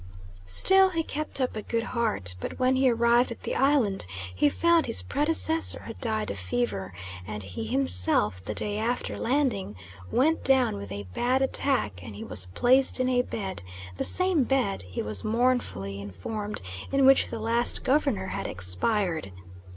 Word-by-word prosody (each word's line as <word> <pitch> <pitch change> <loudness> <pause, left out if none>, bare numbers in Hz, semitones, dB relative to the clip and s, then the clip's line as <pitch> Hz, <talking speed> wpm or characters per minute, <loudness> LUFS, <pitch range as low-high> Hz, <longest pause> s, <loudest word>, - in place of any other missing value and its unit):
Still 380 - +5
he 330 -3 -2
kept 305 -1 -3
up 255 -3 -1
a 215 - -3
good 230 +2 -2
heart, 220 - 0
but - - -6
when 255 +1 +2
he 260 0 +3
arrived 235 +1 +3
at 235 - -9
the - - -3
island 260 - +1 0.3
he 120 +11 +3
found 340 - +2
his 230 - +1
predecessor 320 +2 +1
had - - -9
died 220 -3 0
of 100 - -4
fever; 95 0 -2 0.4
and 105 -1 -5
he 95 +4 -6
himself, 90 0 +2
the 105 +2 -5
day 210 0 -2
after 240 +3 -2
landing, 245 - -1 0.3
went 315 +6 +1
down 265 - +3
with 100 -1 -8
a 100 0 -5
bad 255 +2 +1
attack 255 - 0
and 105 +1 -9
he 105 - -7
was 95 -3 -2
placed 255 - +2
in 255 0 +1
a 250 -1 +3
bed 195 -6 -5 0.4
the - - -1
same 365 -6 +2
bed, 250 -6 0
he 90 +2 -5
was 105 -1 +1
mournfully 215 - -1
informed, 100 - -6 0.3
in 275 -1 +3
which 270 0 +6
the - - -6
last 230 +2 +2
Governor 255 -9 +1
had - - -4
expired. 155 - -1
225 Hz, 170 wpm, -27 LUFS, -, 0.4 s, which